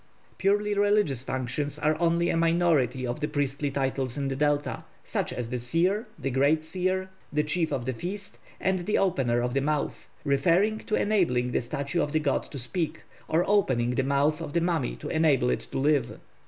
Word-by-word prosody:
Purely 205 +2 +2
religious 205 - +2
functions 130 +3 -3
are 155 +1 +1
only 170 0 +2
a - - 0
minority 165 -7 +2
of 120 0 -3
the 150 - -1
priestly 145 -1 -1
titles 135 -2 -2
in 140 -1 -1
the 135 - -2
Delta, 145 +1 0 0.2
such - - -2
as 120 -1 -4
the 125 - -1
Seer, 180 - 0
the 135 -2 -3
Great 140 +5 +3
Seer, 185 +3 -2 0.2
the 150 0 +1
Chief 160 +1 0
of 130 -4 -2
the 130 - -1
Feast, 195 - -6 0.2
and 190 0 +1
the 210 - +2
Opener 130 -10 +1
of 125 0 -1
the 135 - +1
Mouth, 150 +1 -2 0.2
referring 175 +10 +2
to 215 - -2
enabling 145 -13 +1
the - - +1
statue 140 +6 -2
of 145 - -2
the 155 - +3
god 145 -3 +1
to 140 - -9
speak, 150 +7 -3 0.2
or 165 +3 +2
opening 130 -13 +2
the 125 - +1
mouth 140 +3 +1
of 145 - -6
the 170 - +2
mummy 165 -7 0
to - - -8
enable 150 -6 +3
it - - 0
to - - -4
live. 145 +1 +1
150 Hz, 195 wpm, -27 LUFS, 135-175 Hz, 0.2 s, Great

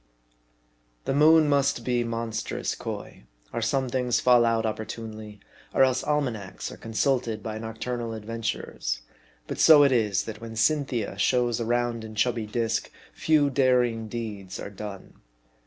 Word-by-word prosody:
THE - - 0
moon 155 +2 +6
must 140 -4 +1
be 125 -1 +1
monstrous 115 -1 -3
coy, - - -7 0.3
or - - -2
some 130 +3 0
things 125 -1 0
fall 120 -2 +5
out 115 -1 +1
opportunely, 110 -1 -6 0.4
or - - +6
else 130 -1 +2
almanacs 125 -11 -2
are - - -10
consulted 115 -1 -1
by 110 -1 -4
noctur 115 +2 -4
nal 115 -1 -4
adventurers; 110 - -4 0.4
but - - -6
so 155 -3 +8
it 140 - +4
is, 105 -6 +2
that 110 -1 -8
when 115 -1 -8
Cynthia 125 -2 0
shows 120 -1 +2
a 115 - -2
round 120 -1 0
and 110 -1 -9
chubby 115 0 +1
disk, 115 0 -1 0.2
few 150 -3 +2
daring 125 -4 +2
deeds 105 -4 -6
are 100 - -6
done. 100 -1 -9
115 Hz, 150 wpm, -26 LUFS, 110-125 Hz, 0.4 s, so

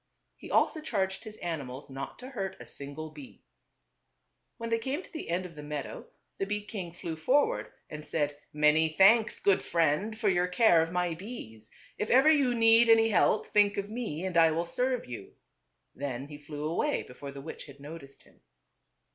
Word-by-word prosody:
He - - -11
also 315 - +2
charged 195 -7 -2
his 215 0 -9
animals 145 -6 -5
not 135 0 -7
to 255 - -9
hurt 195 -8 -4
a - - -10
single 145 +3 -7
bee. 145 -4 -13 1.1
When 230 0 -5
they 230 - +2
came 270 +9 -3
to - - -17
the 315 - -6
end 180 +2 -1
of 175 - -9
the 150 - -9
meadow 145 -2 -6 0.3
the 195 - -1
bee 210 0 -3
king 190 -6 -6
flew 170 -1 -6
forward 285 - +1 0.2
and 150 0 -8
said, 145 -2 -1 0.2
"Many 150 +1 +4
thanks, 210 +7 +5
good 200 -2 +3
friend, 170 +7 +1
for 220 -1 -1
your 180 -2 +3
care 180 -3 +5
of 165 +1 -2
my 180 -1 0
bees. 160 - -9 0.3
If 210 - -2
ever 270 +5 +6
you 275 -5 +3
need 230 0 +6
any 225 0 +6
help, 210 +1 +2
think 205 -1 +4
of 200 +1 -3
me 210 -8 -4
and 185 -2 -3
I 165 -1 +7
will 165 +2 -1
serve 250 +7 -1
you." 120 -5 -9 0.6
Then 135 0 -5
he 145 -1 -9
flew 150 0 -6
away 175 - 0
before 140 +3 -10
the 140 0 -8
witch 160 +2 -8
had 140 -1 -13
noticed 145 -1 -11
him. - - -25
175 Hz, 190 wpm, -30 LUFS, 150-225 Hz, 1.1 s, I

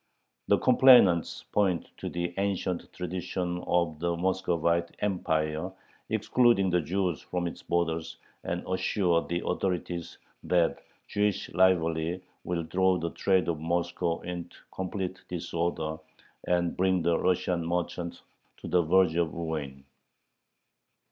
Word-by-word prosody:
The - - +5
complainants 120 -10 +5
point 95 -5 +1
to - - -5
the 85 0 -3
ancient 95 -3 -2
tradition 90 0 -3
of 85 -3 +1
the 85 0 -1
Muscovite 85 -2 0
Empire 80 -3 -1 0.4
excluding 120 -7 +3
the 90 0 +3
Jews 90 0 -1
from 90 -1 -3
its 85 - -5
borders, 80 -1 -1 0.3
and 85 +1 -3
assure 95 -2 +1
the 85 +1 -3
authorities 90 -2 -2 0.3
that 85 -2 +2 0.3
Jewish 105 -1 -1
rivalry 85 -1 +2 0.2
will 85 -2 -2
throw 95 +2 +2
the 85 -1 -3
trade 95 -2 +2
of 85 -3 -1
Moscow 85 +1 -1
into 90 -1 -6 0.2
complete 95 0 -4
"disorder," 85 -2 -2 0.5
and 85 -1 +1
bring 95 -1 +2
the 85 0 +2
Russian 90 -1 +1
merchants 85 0 -3 0.3
to - - -9
the 90 - +3
verge 90 +1 +4
of 85 -2 +1
ruin. 75 -5 -4
85 Hz, 120 wpm, -28 LUFS, 85-95 Hz, 0.5 s, The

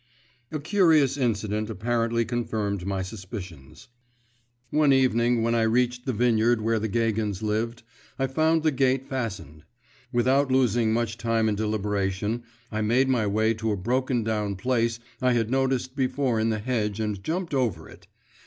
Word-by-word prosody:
A 155 - -3
curious 155 -5 +3
incident 110 -4 -1
apparently 115 +2 0
confirmed 105 -5 -2
my 95 -1 -1
suspicions. 95 - -9 0.8
One 150 -2 +4
evening, 120 -3 +3
when 115 0 +1
I 115 - +2
reached 125 +3 +1
the - - +2
vineyard 120 0 +2
where 110 +1 0
the 110 - -2
Gagins 110 -2 -1
lived, 115 +3 -2 0.3
I 135 - +1
found 155 +4 +1
the 155 - +3
gate 135 0 +1
fastened. 100 - -5 0.5
Without 130 +3 +2
losing 120 -3 +2
much 115 0 -1
time 115 0 +1
in 110 - +1
deliberation, 105 0 -1 0.3
I 110 0 -2
made 125 +5 +2
my 120 -5 +2
way 110 +2 +2
to 110 0 -2
a 105 - -1
broken 125 +4 0
down 105 -2 -1
place 115 +2 0 0.2
I 125 -1 +3
had 115 -1 0
noticed 130 -1 0
before 130 -3 0
in 110 +1 +1
the 110 - 0
hedge 105 -2 -2
and 105 -3 -3
jumped 170 0 -3
over 115 - -1
it. - - -16
115 Hz, 160 wpm, -26 LUFS, 105-130 Hz, 0.8 s, One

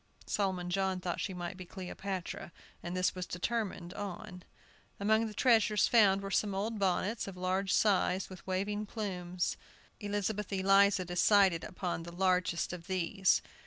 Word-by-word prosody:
Solomon 185 -3 -1
John 190 0 0
thought 180 -1 -3
she - - -2
might 180 0 -5
be 185 - -7
Cleopatra, 185 -1 -6 0.3
and 175 +1 -4
this 185 - +2
was 185 0 -5
determined 185 -2 -3
on. 200 -1 -6 0.6
Among 220 +2 +2
the 215 - -7
treasures 220 -5 +4
found 200 -4 +5
were 195 - -5
some 200 -1 +1
old 215 +3 -2
bonnets, 195 +4 0
of 190 -2 -8
large 185 +1 0
size, 190 -2 +2
with 185 -1 -12
waving 205 +3 -2
plumes. 185 -5 -3 0.4
Elizabeth 205 0 -2
Eliza 195 0 +4
decided 180 -1 +4
upon 180 -2 -3
the 170 +1 -8
largest 180 -1 +1
of 175 -1 -8
these. 185 +1 +2
190 Hz, 150 wpm, -32 LUFS, 180-205 Hz, 0.6 s, found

